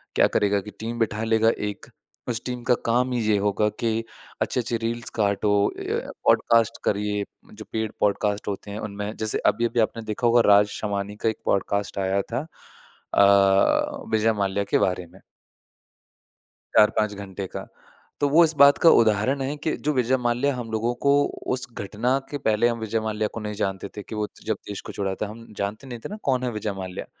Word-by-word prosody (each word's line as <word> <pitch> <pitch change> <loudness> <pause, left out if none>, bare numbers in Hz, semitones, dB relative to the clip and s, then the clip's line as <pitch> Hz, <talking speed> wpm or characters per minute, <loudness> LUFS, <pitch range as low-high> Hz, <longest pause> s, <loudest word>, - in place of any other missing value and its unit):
क्या - - +5
करेगा 100 0 +1
कि 105 +1 -10
टीम 115 +2 -4
बिठा 110 -1 0
लेगा 110 0 +3 0.2
एक, 100 - -9 0.4
उस 115 -1 -2
टीम 125 -1 -4
का 125 +1 +3
काम 125 +2 +2
ही 125 - 0
ये 105 - +4
होगा 105 +1 +1
कि 115 -1 0 0.4
अच्छे-अच्छे 120 -1 0
रील्स 115 +1 -3
काटो 105 0 +2
अ, - - -6
य - - -2 0.2
पॉडकास्ट 115 -2 +4
करिए। 105 0 0 0.3
जो 110 0 -10
पेड 110 -1 -1
पॉडकास्ट 105 0 0
होते 100 0 -4
हैं 105 - -5
उनमें 105 0 -5
जैसे 110 -1 -1
अभी-अभी 120 0 +1
आपने 115 0 0
देखा 110 +3 -1
होगा 120 +1 +5
राज 105 0 +6
शमानी 100 -1 -3
का - - +5
एक 110 - -4
पॉडकास्ट 100 +1 0
आया 95 +1 +1
था 145 - -1 0.7
अ, 100 -1 +4
विजय 110 +1 +3
माल्या 100 -1 0
के - - +5
बारे 90 -1 -3
में 95 - -16 1.6
4-5 105 0 +4
घंटे 100 -1 -6
का, - - -7 0.5
तो 145 - +2
वो 165 +4 +6
इस 160 - 0
बात 140 0 +7
का - - +10
उदाहरण 115 +5 +1
है 135 +2 -2
कि 155 - 0
जो 150 - +3
विजय 130 0 +2
माल्या 125 +3 0
हम 120 -2 -6
लोगों 115 +2 0
को 140 - +6 0.4
उस 125 - -5
घटना 110 +6 -1
के 145 - -2
पहले 110 +2 +3
हम 115 -1 -1
विजय 110 0 -1
माल्या 110 -1 -1
को - - -4
नहीं 105 -1 -4
जानते 95 -1 -2
थे, 105 - -5
कि 110 - -8
वो 105 0 -1
त - - -22
जब 110 -2 -1
देश 100 -1 -5
को - - -8
छोड़ा 95 -1 -2
था, 105 - -3
हम 115 +2 -10
जानते 105 +7 -4
नहीं 120 -2 -7
थे - - -4
ना 210 - -6
कौन 130 -2 +1
है 125 - -1
विजय 105 -1 -3
माल्या? 95 -1 -6
110 Hz, 200 wpm, -24 LUFS, 100-120 Hz, 1.6 s, का